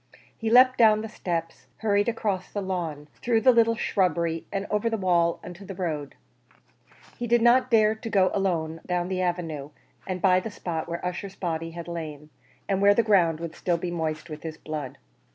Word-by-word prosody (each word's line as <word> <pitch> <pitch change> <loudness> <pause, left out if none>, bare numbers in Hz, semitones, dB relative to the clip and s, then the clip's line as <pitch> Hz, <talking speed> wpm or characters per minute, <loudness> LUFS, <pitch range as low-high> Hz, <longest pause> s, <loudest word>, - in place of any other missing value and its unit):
He 225 - -3
leapt 255 +2 +6
down 215 -2 +6
the 220 - -5
steps, 165 -5 -4
hurried 205 0 +1
across 205 -5 -2
the 205 - -3
lawn, 165 -6 -4
through 230 -2 +2
the 255 - +7
little 230 -1 +4
shrubbery, 170 -6 0
and 195 0 -2
over 210 +2 +1
the 225 - -1
wall 175 -3 +2
into 175 +3 -9
the 195 -1 -8
road. 155 -6 -3 1.0
He 240 - -2
did 235 0 +3
not 250 +2 +5
dare 215 -2 +4
to 225 +1 -7
go 195 -3 +3
alone 165 -5 -1
down 180 0 -1
the 185 -1 -1
avenue, 165 -5 -2 0.4
and 185 -1 -3
by 185 0 +4
the 205 - -5
spot 170 -6 -4
where 170 +1 -4
Ussher's 180 +2 -4
body 165 -3 -3
had 170 +1 -8
lain, 155 -3 -7 0.4
and 195 -1 0
where 200 0 +6
the 235 - +3
ground 175 -7 +3
would 165 -1 -5
still 175 -2 0
be 175 +1 -4
moist 160 -2 -3
with 155 -1 -8
his 160 -1 -6
blood. 150 -5 -6
180 Hz, 195 wpm, -26 LUFS, 165-215 Hz, 1.0 s, the